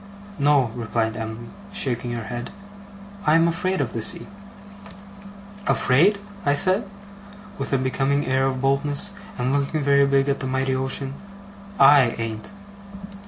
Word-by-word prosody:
'No,' 140 -5 +3
replied 115 -1 -2
Em'ly, 110 +1 -6 0.2
shaking 120 - -2
her 115 -1 -4
head, 120 +1 -6 0.8
'I'm 165 +2 +5
afraid 185 +2 -1
of 125 -5 -3
the 115 - -3
sea.' 110 - 0 1.4
'Afraid!' 170 +11 +3 0.3
I 145 -3 +2
said, 190 +6 +3 0.7
with - - -4
a 135 - +3
becoming 135 +2 0
air 130 +1 +1
of 130 -1 -3
boldness, 140 +7 +1 0.3
and 125 +1 -1
looking 145 +2 0
very 140 0 +4
big 140 0 +2
at 140 0 0
the 130 - -3
mighty 130 0 -1
ocean. 135 +1 -2 0.7
'I 140 +1 +8 0.2
an't! 110 -1 -5
135 Hz, 135 wpm, -23 LUFS, 125-145 Hz, 1.4 s, I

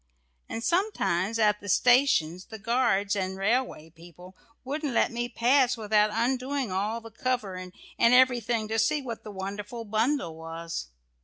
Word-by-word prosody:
And 230 - -5
sometimes 230 - 0
at 210 -2 +3
the 205 - -8
stations, 190 - +3
the 220 - -9
guards 220 -3 +1
and 190 -1 -3
railway 195 -6 -1
people 175 +3 -15 0.3
wouldn't 285 0 -3
let - - +3
me 240 +1 -3
pass 250 +1 +3
without 210 -1 +2
undoing 255 +2 -1
all 210 +5 -2
the 225 0 -12
cover 235 -4 -2
and 185 0 -8 0.3
everything 240 -2 +4
to 225 0 0
see 295 +6 +1
what 235 -3 -6
the 215 - -9
wonderful 205 +4 -6
bundle 220 - 0
was. 165 - -6
225 Hz, 150 wpm, -27 LUFS, 190-250 Hz, 0.3 s, everything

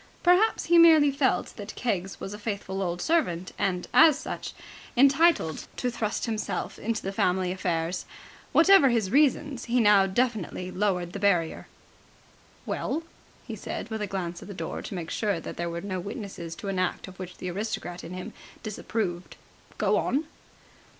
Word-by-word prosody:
Perhaps 365 +5 +4
he 340 0 +5
merely 315 -4 +7
felt 275 -1 0
that 210 -1 -7
Keggs 195 -6 -2
was 195 - -6
a 210 - -8
faithful 200 -2 -4
old 175 -1 -2
servant 185 - 0
and, 180 -2 -1
as 320 -4 +7
such, - - -6 0.4
entitled 275 - +4
to 250 - -1
thrust 215 -3 -2
himself 220 -2 -3
into 225 +1 -2
the 195 - -2
family 185 -1 +1
affairs. 175 -2 -2 0.5
Whatever 335 -4 +7
his 225 -6 0
reasons, 285 -1 +2
he 245 +1 +1
now 205 -3 +5
definitely 195 -4 -1
lowered 180 -3 -1
the 200 - -5
barrier. 180 -5 +1 1.0
"Well," 325 - -2 0.4
he - - -6
said, - - -6
with 220 -1 -3
a 210 - -1
glance 175 -3 -4
at - - -10
the 200 - -8
door - - -4
to - - -7
make 170 -2 -5
sure 205 -6 0
that - - -7
there 170 0 -2
were 170 0 -4
no 185 -1 -3
witnesses 180 -3 -6
to 200 - -8
an 190 -1 -1
act 185 +1 -1
of 190 0 -13
which 180 -1 -7
the 180 - -4
aristocrat 180 -2 -4
in 180 - -7
him 185 +5 -7 0.3
disapproved, 200 -4 -3 0.4
"go - - +2
on!" 285 +4 0
200 Hz, 170 wpm, -27 LUFS, 180-245 Hz, 1.0 s, merely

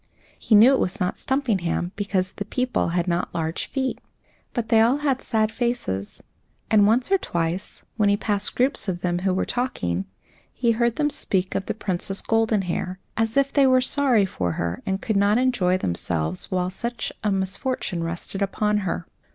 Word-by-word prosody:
He 220 - +3
knew 230 +6 +8
it 265 - +2
was 180 - -1
not 180 0 -1
Stumpinghame, 200 -10 -1
because 195 -2 -1
the - - -4
people 250 +4 0
had 175 +1 0
not 175 0 -1
large 160 0 -2
feet. 265 -2 -2 0.5
But 235 -3 -3
they 225 -1 +5
all 240 +5 +4
had 280 -3 0
sad 220 -1 +1
faces, 230 - -2 0.5
and 205 -2 +6
once 245 - +2
or 390 - +4
twice, 170 - -3
when 210 -2 +3
he 200 - +3
passed 205 -1 -1
groups 255 -2 +1
of 175 -2 -2
them 175 -1 0
who 190 +1 0
were 185 - 0
talking, 95 - -2 0.5
he 235 -2 +1
heard 235 0 +1
them 295 -1 +1
speak 190 -9 -1
of 195 - -2
the - - -2
Princess 195 -1 -2
Goldenhair, 205 -5 0 0.2
as 225 +2 0
if 275 0 +2
they 275 -2 +5
were 255 0 +5
sorry 255 -5 +3
for 90 - -2
her 85 +2 -3
and 190 0 -1
could 220 -3 0
not 200 +2 +3
enjoy 245 -8 +2
themselves 85 - -2
while 180 0 -1
such 235 +4 -4
a 210 - +1
misfortune 190 -1 -2
rested 170 +4 -4
upon 210 +1 +1
her. 180 -3 -3
205 Hz, 185 wpm, -24 LUFS, 180-240 Hz, 0.5 s, knew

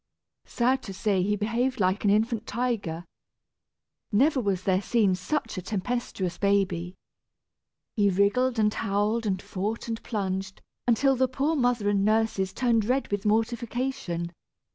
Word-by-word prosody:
Sad 255 +2 +1
to 195 - -8
say, 200 -1 +1
he 205 +3 +1
behaved 235 +5 -1
like 185 +2 +1
an 205 - +3
infant 220 +2 +1
tiger. 210 -9 -2 1.1
Never 265 +6 +3
was 195 -4 -1
there 190 0 +2
seen 210 -3 +2
such 185 +3 -2
a - - -6
tempestuous 195 -3 -3
baby. 190 -3 +1 1.0
He 205 -3 +3
wriggled, 205 +7 +2
and 210 -1 +3
howled, 215 +2 0
and 190 -2 0
fought, 205 +4 -4
and 225 -1 -3
plunged, 190 -3 -3 0.3
until 270 +3 +3
the 260 +1 +2
poor 275 +5 0
mother 245 -6 +1
and 200 -1 +2
nurses 215 -3 +1
turned 230 0 +1
red 255 +2 0
with 205 +1 -1
mortification. 225 -5 -1
210 Hz, 140 wpm, -27 LUFS, 195-240 Hz, 1.1 s, an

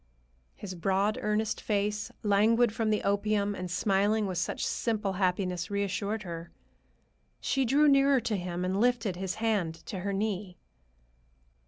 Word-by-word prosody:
His 190 -2 -7
broad, 195 +4 0
earnest 210 0 0
face, 210 0 -1
languid 220 +3 +4
from 225 -1 0
the 215 - +1
opium 205 0 +1
and 185 -2 -5
smiling 200 +4 +1
with 185 -3 -2
such 180 - -2
simple 210 -4 -1
happiness, 180 -1 -1
reassured 200 +2 -2
her. 170 -2 -7 0.9
She 270 -1 0
drew 285 +5 +4
nearer 275 -1 +5
to 220 - -1
him 180 -1 -3
and 190 +2 0
lifted 240 -6 +1
his 185 0 -3
hand 210 -7 0
to 190 - -5
her 200 +2 -2
knee. 195 -2 -2
205 Hz, 145 wpm, -29 LUFS, 185-220 Hz, 0.9 s, nearer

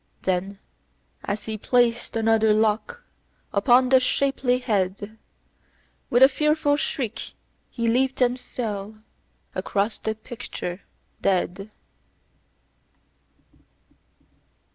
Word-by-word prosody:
Then, 190 +2 -1 0.7
as 205 +1 -3
he 220 -1 -4
placed 240 0 +1
another 220 -1 +3
lock 220 - 0 0.5
upon 250 0 +4
the 260 0 +6
shapely 255 -1 +1
head, 205 -2 -2 0.9
With 245 +2 +5
a - - +11
fearful 300 +1 +1
shriek, 250 -5 -3 0.4
he 235 -2 -2
leaped 255 +3 +1
and 250 0 +2
fell 215 -4 -5 0.6
across 205 +1 -1
the 220 0 -2
picture 205 -5 -7 0.4
dead. 195 +1 0
225 Hz, 90 wpm, -24 LUFS, 205-255 Hz, 0.9 s, a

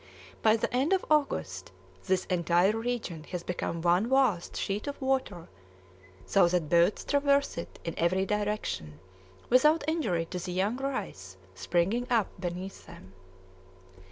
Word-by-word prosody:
By 220 0 +5
the 225 - -2
end 275 +8 +2
of 380 - +1
August 95 - 0 0.4
this 185 -1 +1
entire 180 +3 +2
region 225 -9 -3
has 180 -2 -5
become 170 -2 -3
one 180 +6 +3
vast 260 -10 +2
sheet 200 +6 -3
of 285 - -5
water, 260 -10 -1 0.8
so 185 - +4
that 170 -3 0
boats 170 +4 +3
traverse 280 0 +2
it 170 - -7
in 165 - -4
every 185 +3 +2
direction 205 - -2 0.5
without 300 +5 +4
injury 220 - 0
to 180 - -3
the 180 +1 -5
young 200 +6 0
rice 195 - -5 0.2
springing 180 - 0
up 230 -5 +2
beneath 180 +2 -6
them. 95 +1 -13
195 Hz, 140 wpm, -29 LUFS, 170-250 Hz, 0.8 s, By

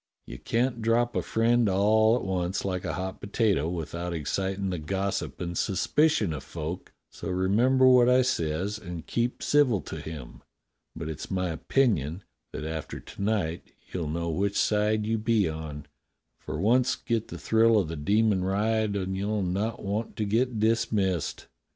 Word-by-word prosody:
You - - -9
can't 120 0 0
drop 120 +2 +2
a - - +2
friend 115 0 +2
all 110 +4 +4
at 125 - -2
once 95 0 -2
like 95 -1 -2
a 85 - -2
hot 95 +4 -5
potato 100 -6 +1
without 85 +1 -4
excitin' 95 +5 -2
the 90 - -3
gossip 95 +5 -2
and 85 0 -4
suspicion 110 - +2
of 70 -3 -6
folk; 80 +4 -6 0.2
so - - -7
remember 110 +9 +3
what 125 -1 +6
I 130 +1 +5
says 95 -1 -1
and 90 -5 -7
keep 120 +1 -1
civil 140 -8 +3
to - - -7
him. 80 -6 -8 0.5
But 80 -1 -5
it's 80 -1 -6
my 90 -1 -1
opinion 85 - 0 0.3
that 75 - -5
after 80 -1 -5
to - - -11
night 100 -6 -1 0.2
you'll 85 -4 -2
know 85 +1 -2
which 100 +5 0
side 105 0 +2
you 110 0 0
be 110 -3 +2
on, 80 -2 -6 0.5
for 75 - -5
once 120 +6 +3
get 115 -2 -2
the - - -7
thrill 115 0 +4
of 95 -5 +2
the 80 - -5
demon 100 +5 +2
ride 105 +2 +1
and 95 -1 -2
you'll 100 +1 -1
not 100 +5 -2
want 105 +3 -3
to 105 - -1
get 115 +3 0
dismissed. 105 -5 0
100 Hz, 170 wpm, -27 LUFS, 85-115 Hz, 0.5 s, what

